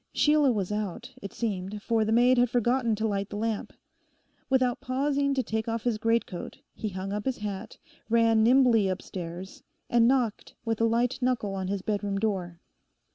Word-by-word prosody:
Sheila 295 -2 +4
was 205 -4 -2
out, 210 -4 -4
it 200 - -6
seemed, 205 -2 -4
for 230 -2 +2
the 215 - -1
maid 245 +2 +5
had 245 -1 +3
forgotten 240 -1 +1
to 220 +1 -1
light 200 -1 -2
the - - -7
lamp. 220 0 -2 0.8
Without 255 -2 +2
pausing 280 +2 0
to 260 - +1
take 220 0 -3
off 230 -1 -2
his 235 -3 0
greatcoat, 225 -5 -1 0.2
he 215 - -4
hung 190 +1 -5
up 210 0 -3
his 265 - -1
hat, 210 +1 -6 0.3
ran 230 -1 +4
nimbly 235 -3 +5
upstairs, 185 -1 -6 0.3
and 235 -1 +5
knocked 245 -4 0
with 225 -1 -1
a - - +5
light 240 +3 +1
knuckle 245 -5 0
on 190 -1 -3
his 195 0 -3
bedroom 205 -2 -1
door. 190 -5 -2
220 Hz, 180 wpm, -27 LUFS, 200-245 Hz, 0.8 s, maid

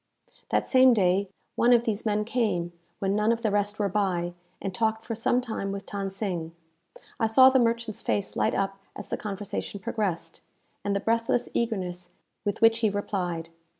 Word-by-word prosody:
That - - +1
same 255 -2 +6
day, 190 -1 +2 0.3
one 240 - +4
of 235 -1 +5
these 220 -1 -2
men 210 0 +1
came, 210 -8 -1 0.2
when 195 0 0
none 210 +2 +3
of 230 +1 -1
the 215 - +2
rest 205 +1 0
were 205 - +1
by, 180 -3 0 0.3
and 195 - -4
talked 220 +2 0
for 230 - -3
some 235 +2 +1
time 220 -5 -4
with 200 0 -5
Than 200 -1 -3
Sing. 180 -5 -3 0.6
I 225 - +3
saw 260 +4 +7
the 265 - +4
merchant's 230 -2 0
face 200 - -1
light - - +1
up 195 0 -1 0.2
as - - -8
the - - -1
conversation 200 0 -5
progressed, 190 -7 -3 0.4
and 200 0 0
the 200 - 0
breathless 230 +1 +1
eagerness 180 -6 -2 0.3
with 205 +1 -2
which 225 0 +6
he 220 -2 +3
replied. 180 -5 -3
205 Hz, 185 wpm, -27 LUFS, 195-230 Hz, 0.6 s, saw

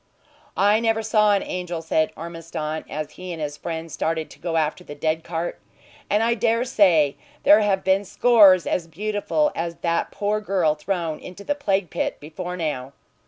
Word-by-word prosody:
"I 205 +2 +4
never 225 -1 +1
saw 215 -1 +3
an 195 - 0
angel," 175 -2 -4
said 160 -1 +1
Ormiston, 165 -2 -5
as 155 0 -4
he 185 0 -8
and 165 - -6
his 150 -1 -3
friend 165 +1 -5
started 160 0 -2
to - - -15
go 165 -1 -2
after 155 +3 -1
the 145 - -9
dead 155 +2 -1
cart. 170 0 -4 0.5
"And 210 +2 +2
I 235 +1 +3
dare 230 +1 +1
say 170 - +3 0.3
there 205 - +7
have 200 -2 +1
been 190 +1 +2
scores 200 -3 +5
as 170 -2 -1
beautiful 210 - 0
as 170 0 -3
that 170 -1 0
poor 210 +1 -1
girl 185 -7 +1
thrown 165 0 -3
into 185 +2 -10
the 290 - 0
plague 200 - -1
pit - - -2
before 180 +4 -6
now. 140 -5 -3
180 Hz, 180 wpm, -23 LUFS, 160-205 Hz, 0.5 s, there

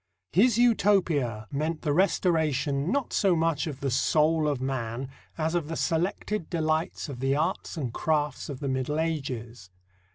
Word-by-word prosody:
His 225 +5 +4
Utopia 175 - +2
meant 155 +3 -2
the 145 - +1
restoration, 155 -4 +1
not 280 -1 -1
so 195 -4 +3
much 165 -2 0
of 140 -3 -6
the 135 -2 -1
soul 155 +4 +2
of 145 -3 0
man, 130 -1 -3 0.3
as 160 0 -1
of 170 -4 0
the 165 - -4
selected 180 +3 -1
delights 160 -1 -1
of 135 -4 -7
the 135 +1 +1
arts 165 +3 -2
and 130 -7 -3
crafts 150 -2 -1
of 140 -1 -6
the 140 - -2
Middle 130 +3 -1
Ages. 125 - -3
155 Hz, 160 wpm, -27 LUFS, 135-165 Hz, 0.3 s, His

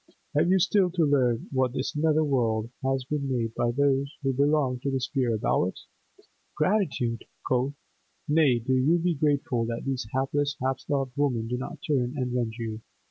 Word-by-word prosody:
Have 155 +4 +3
you 190 - +5
still 190 0 +3
to 175 -2 +1
learn 125 -5 +2
what 130 -2 +1
this 135 +3 -3
nether 155 +1 +3
world 115 -5 0
has 135 0 0
been 140 -1 -2
made 115 -3 -1
by 120 - 0
those 140 +2 +1
who 135 -1 +1
belong 140 -2 +2
to 140 - -2
the 135 -1 0
sphere 130 -3 0
above 105 -4 +1
it?—Gratitude, 150 - -3 0.2
quotha?—Nay, 140 +2 0
do 130 - +1
you 140 +7 +3
be 175 +1 +1
grateful 145 -5 +1
that 115 0 -4
these 130 -5 -2
hapless, 145 +2 0
half 130 +1 -1
starved 135 -3 -2
women 125 -6 0
do 125 - -2
not 145 +5 -6
turn 130 -4 +1
and 125 -2 -2
rend 120 -3 -1
you. 110 -2 -5
135 Hz, 175 wpm, -27 LUFS, 125-145 Hz, 0.2 s, you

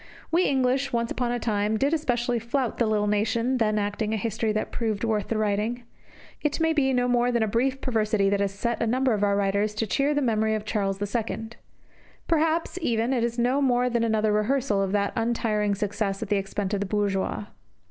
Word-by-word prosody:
We 345 +3 +3
English, 265 0 +1
once 235 -1 -1
upon 245 -1 -1
a 245 - 0
time, 215 -2 0
did 280 +6 +1
especially 245 -6 0
flout 235 +2 -2
the 235 - +3
little 210 -1 +1
nation 225 +5 +1
then 215 -2 +2
acting 210 +1 -1
a - - -1
history 220 +1 -1
that 215 0 -2
proved 220 -3 -2
worth 215 -3 0
the 225 - -1
writing. 215 +3 -1 0.6
It 300 +1 -1
may 320 0 +2
be 275 -4 +2
no 250 -1 +1
more 245 0 +2
than 235 -2 +1
a - - 0
brief 260 +5 0
perversity 215 -5 +1
that 200 - +1
has 200 -1 0
set 235 +4 -2
a 230 - +1
number 255 +1 +2
of 205 -1 0
our 200 -1 +3
writers 200 +1 0
to 225 - -1
cheer 275 +9 +1
the 290 - +1
memory 220 -2 +1
of 215 - -4
Charles 195 -3 -1 0.2
II. 225 -1 -2 0.8
Perhaps, 325 +2 +1
even, 235 -3 +1
it 240 -3 +1
is 235 0 -1
no 250 +4 +2
more 250 -2 +2
than 235 -1 +1
another 220 -1 +1
rehearsal 215 0 +1
of 195 -1 -1
that 200 -1 +1
untiring 220 -3 0
success 200 -1 -2
at - - -7
the 205 - +2
expense 195 +1 -3
of 200 - 0
the 200 - -2
bourgeois. 205 0 -1
225 Hz, 215 wpm, -26 LUFS, 210-245 Hz, 0.8 s, We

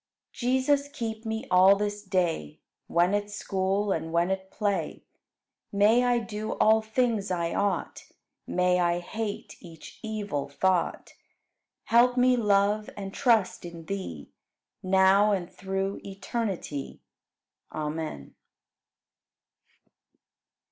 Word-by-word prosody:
12. - - -16
Jesus, 260 +3 +2
keep 230 -5 -5
me 220 0 -3
all 185 +2 +7
this 205 0 -3
day. 175 - -1 0.3
When 175 +3 +2
at 205 0 -1
school 195 0 -1
and 160 -2 -2
when 170 +2 +1
at 190 0 -3
play; 205 -2 -2 0.7
May 210 +5 +4
I 245 -1 +3
do 220 -2 -4
all 220 +1 +4
things 220 -2 0
I 170 -2 -1
ought, 200 -4 -2 0.4
May 180 0 +2
I 175 -1 +2
hate 205 +4 -5
each 165 -3 -13
evil 205 -11 -3
thought; 180 +4 0 0.7
Help 245 +2 +4
me 250 0 +5
love 210 -1 +2
and 195 -1 -6
trust 230 -7 +2
in 170 -2 -9
Thee 160 - -6 0.5
Now 190 +2 +4
and 180 -3 -3
through 195 +1 -3
eternity. 195 -7 -4 0.7
Amen. 150 - -5
200 Hz, 115 wpm, -27 LUFS, 180-220 Hz, 0.7 s, all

